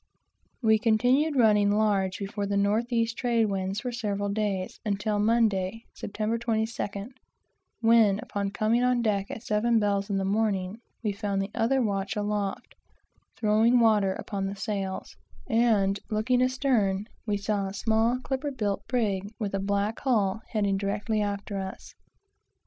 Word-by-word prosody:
We 220 -1 +4
continued 250 +7 +2
running 210 -5 +4
large 200 -3 +1
before 200 0 -4
the 200 0 0
north 215 +5 +1
east 230 -1 +1
trade 235 -2 +2
winds 195 0 -2
for 250 - -3
several 205 -4 -2
days, 200 -3 -2
until 205 0 -1
Monday 220 -1 +1
September 215 +3 -3
22d; 220 -1 -2 0.7
when, 225 -3 +5
upon 200 -1 -3
coming 215 +4 +1
on 250 -1 +2
deck 200 -3 0
at 225 - -7
seven 225 +2 +2
bells 200 -1 0
in 200 - 0
the 195 - -1
morning, 200 -1 0 0.2
we 210 - +1
found 200 -1 -2
the 195 +1 -3
other 260 +3 +2
watch 200 -1 -1
aloft 205 -1 -2 0.6
throwing 225 +3 +4
water 210 -4 +4
upon 195 0 -4
the 195 - -4
sails; 195 -1 -4 0.3
and 215 -4 +2
looking 225 +3 +1
astern, 250 -7 +1 0.2
we 205 -1 +1
saw 200 -1 -1
a 195 - -6
small 225 +3 +2
clipper 270 +2 -2
built 210 -7 -2
brig 205 -5 -1
with 205 -4 -3
a 195 - 0
black 200 +2 -1
hull 220 -6 +1
heading 200 -3 0
directly 205 +2 -1
after 200 -1 -3
us. 190 0 -7
210 Hz, 150 wpm, -27 LUFS, 200-230 Hz, 0.7 s, when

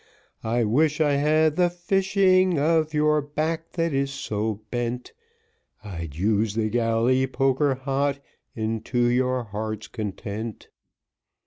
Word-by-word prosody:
I 115 +2 +1
wish 150 +8 +2
I 150 -2 +3
had 155 +2 +2
the 180 -1 +4
fishing 185 0 +2
of 155 +1 +2
your 150 0 +2
back 155 +3 -3
that 165 -2 0
is 135 0 0
so 110 -5 -3
bent, 120 0 -3 0.7
I'd 85 -8 -7
use 105 +4 +1
the 110 -1 0
galley 120 +3 +2
poker 135 +1 +1
hot 140 +1 -1 0.4
unto 110 +2 -3
your 125 +1 +1
heart's 110 0 -5
content. 110 0 -6
130 Hz, 120 wpm, -25 LUFS, 110-155 Hz, 0.7 s, the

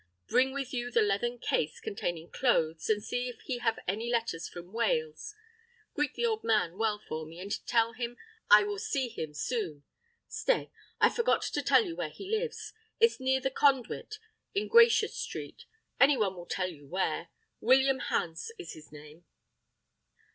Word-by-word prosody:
Bring 260 +1 +3
with 275 -1 -4
you 245 -1 -2
the 235 -2 +3
leathern 210 +4 0
case 155 -8 -1
containing 175 -4 -4
clothes, 165 -11 +1
and 210 -1 +2
see 245 0 -2
if 245 - -10
he 250 -3 -4
have 225 -2 +1
any 220 +6 -1
letters 230 -8 -1
from 175 +2 -11
Wales. 450 - -1 0.6
Greet 295 -2 -1
the 475 - 0
old 445 -1 0
man 210 -6 +2
well 220 -2 +1
for 160 -6 -6
me, 160 +2 -11
and 200 +2 -4
tell 230 -1 +2
him 240 +1 -5 0.3
I 210 0 +9
will 205 -1 -3
see 260 +4 -1
him 160 -9 -6
soon. 170 - -3 0.4
Stay; - - 0 0.3
I - - +6
forgot 470 0 +1
to - - -1
tell - - +4
you 340 -3 -5
where - - -3
he 390 - -10
lives; 440 -2 -4 0.3
it's 460 -6 +4
near 265 0 +2
the 270 - -1
Conduit 275 - +1 0.4
in 405 - 0
Gracious 465 -2 +5
Street, - - -6 0.3
any 275 0 +6
one 210 -4 +2
near 185 - -14
will 175 - -8
tell 185 -1 -1
you 145 -4 -14
where. 185 +5 -1 0.3
William 265 0 +4
Hans 165 - -2
is 370 - -8
his 155 -1 -14
name." 150 +3 -13
235 Hz, 175 wpm, -30 LUFS, 185-275 Hz, 0.6 s, I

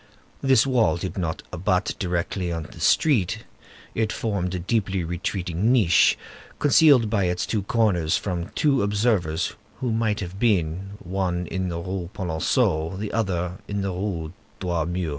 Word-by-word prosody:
This 135 -4 +4
wall 125 -8 +2
did 90 +2 -5
not 85 -3 -3
abut 90 +1 0
directly 90 0 -1
on 85 -1 -3
the - - -12
street; 125 - +2 0.5
it 110 -1 0
formed 95 -5 -2
a - - -1
deeply 95 0 0
retreating 90 +4 -1
niche, 90 -8 +5 0.4
concealed 145 -5 +5
by 105 -3 +1
its 90 0 0
two 110 - -1
corners 95 -7 +2
from 90 -3 -3
two 145 -4 +3
observers 100 -6 +1 0.3
who 125 -2 -1
might 110 -2 0
have 95 0 -6
been, 95 -4 +1
one 90 -1 -1
in 95 0 -2
the 85 - -3
Rue 90 0 -4
Polonceau, 80 -1 0
the 105 +1 -4
other 90 -5 -1
in 100 0 -2
the 95 - -1
Rue 90 -4 -3 0.3
Droit 85 -4 -1
Mur. 85 -1 -2
95 Hz, 155 wpm, -24 LUFS, 85-105 Hz, 0.5 s, niche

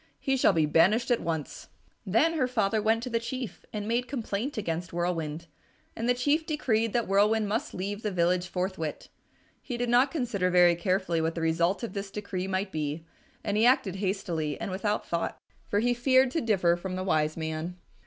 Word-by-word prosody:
He 270 - 0
shall 255 - +4
be 160 -3 +3
banished 190 - +3
at 240 - +3
once." 160 -3 -4 0.4
Then 230 - +3
her 270 -6 +1
father 220 -4 +1
went 225 +2 +2
to 250 - -4
the 230 - +1
Chief 245 0 -6
and 210 -1 -4
made 240 +2 0
complaint 235 0 -3
against 170 -4 -3
Whirlwind, 170 -2 -2 0.5
and 230 +2 -2
the 245 - +4
Chief 285 +6 +1
decreed 230 -8 0
that 235 -1 +1
Whirlwind 210 +2 +3
must 220 +3 -2
leave 200 +3 -4
the 215 - -1
village 180 -1 +1
forthwith. 180 -4 -3 0.5
He 245 - -5
did 245 0 -1
not 245 +3 +5
consider 235 - -1
very 180 -1 +6
carefully 180 -2 0
what 160 +1 -1
the 165 - -3
result 170 +6 +1
of 235 - -4
this 200 -1 -4
decree 195 -2 -4
might 190 +1 -2
be, 155 +1 -3 0.4
and 205 -1 -1
he 220 - +4
acted 200 -7 +2
hastily 180 -6 -2
and - - -4
without 205 +3 -1
thought, 170 0 -2 0.3
for 205 - 0
he 245 +1 +2
feared 260 +1 +3
to 325 - 0
differ 190 -7 +2
from 185 +1 -5
the 185 - -3
wise 155 -4 +1
man. 160 +2 -4
200 Hz, 195 wpm, -28 LUFS, 175-235 Hz, 0.5 s, very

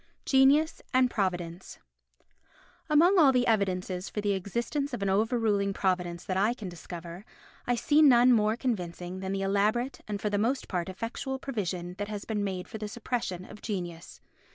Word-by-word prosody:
Genius 280 +4 +4
and 255 -1 +4
Providence 180 -3 -3 1.1
Among 345 +6 +5
all 285 -5 +7
the 250 -1 +2
evidences 190 -4 0
for - - -4
the 205 0 0
existence 235 +8 -2
of 205 - -5
an 195 - +1
overruling 210 -1 +1
Providence 180 -3 -1
that 185 - -2
I 215 +5 +2
can 215 -5 -7
discover, 175 +1 -8 0.4
I 245 - +2
see 295 +5 +3
none 250 -4 +7
more 215 0 +2
convincing 180 -7 -3
than 190 0 -4
the 195 0 -1
elaborate 210 +6 0
and 205 -1 -3
for 210 +1 -2
the 205 - +1
most 250 +6 0
part 180 -1 -2
effectual 230 +7 -4
provision 185 -9 -4
that 205 - -2
has 210 -1 -6
been 210 -2 -2
made 185 -2 -3
for 220 - -8
the 210 - -4
suppression 215 -5 -3
of 210 - -12
genius. 175 -5 -6
205 Hz, 175 wpm, -29 LUFS, 185-245 Hz, 1.1 s, all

